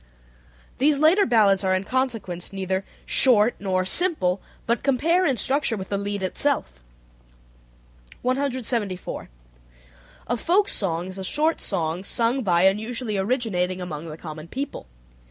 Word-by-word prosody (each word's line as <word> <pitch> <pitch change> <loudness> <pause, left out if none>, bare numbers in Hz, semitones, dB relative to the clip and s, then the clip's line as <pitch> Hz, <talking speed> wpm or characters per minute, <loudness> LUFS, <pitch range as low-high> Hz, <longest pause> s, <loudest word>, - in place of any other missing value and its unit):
These 290 +2 +3
later 335 +7 +4
ballads 205 -4 +4
are 185 0 +2
in 185 - -1
consequence 220 -8 -2
neither 190 0 -2 0.2
"short" 240 -3 +4
nor 185 -2 0
"simple" 200 - +2 0.2
but 235 -1 0
compare 330 +7 +2
in 265 -4 +1
structure 265 0 0
with 190 -1 -7
the 200 - 0
lied 200 -1 -3
itself. 120 - 0 1.5
174. 250 -7 -1 1.0
A - - -1
folk 375 - +2
song 175 -3 0
is 190 +1 -8
a - - -4
short 310 - +1
song 170 -2 -2
sung 235 +5 0
by 175 -5 +2
and 195 +2 +4
usually 230 -1 -3
originating 190 -4 0
among 165 -3 -6
the 155 -1 -8
common 155 -1 -8
people. 265 - -5
205 Hz, 135 wpm, -24 LUFS, 185-260 Hz, 1.5 s, later